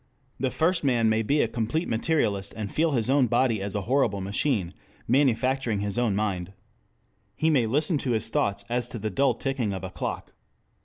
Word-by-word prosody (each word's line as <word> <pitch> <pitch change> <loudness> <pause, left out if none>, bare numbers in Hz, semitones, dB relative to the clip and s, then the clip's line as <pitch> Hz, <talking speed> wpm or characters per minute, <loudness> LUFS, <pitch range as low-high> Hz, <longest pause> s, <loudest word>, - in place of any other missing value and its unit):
The 130 - 0
first 165 +5 0
man 120 -5 +3
may 110 0 +2
be 140 +7 +2
a - - 0
complete 120 +9 -2
Materialist 110 -6 0
and 105 -2 -5
feel 160 -1 +1
his 115 -5 0
own 135 -1 +3
body 120 -3 +1
as 100 0 -4
a 105 - 0
horrible 115 -2 +1
machine 100 - -1 0.3
manufacturing 130 -3 +1
his 100 +2 -1
own 115 -5 +1
mind. 95 -3 -2 0.8
He 160 +1 +2
may 125 -7 +3
listen 150 +6 +1
to 125 -3 -1
his 110 0 +1
thoughts 100 -2 0
as 120 0 0
to - - -5
the 110 0 -3
dull 135 +7 +2
ticking 130 -7 -2
of 95 -1 -6
a 95 - -5
clock. 85 - -5
115 Hz, 195 wpm, -26 LUFS, 100-135 Hz, 0.8 s, man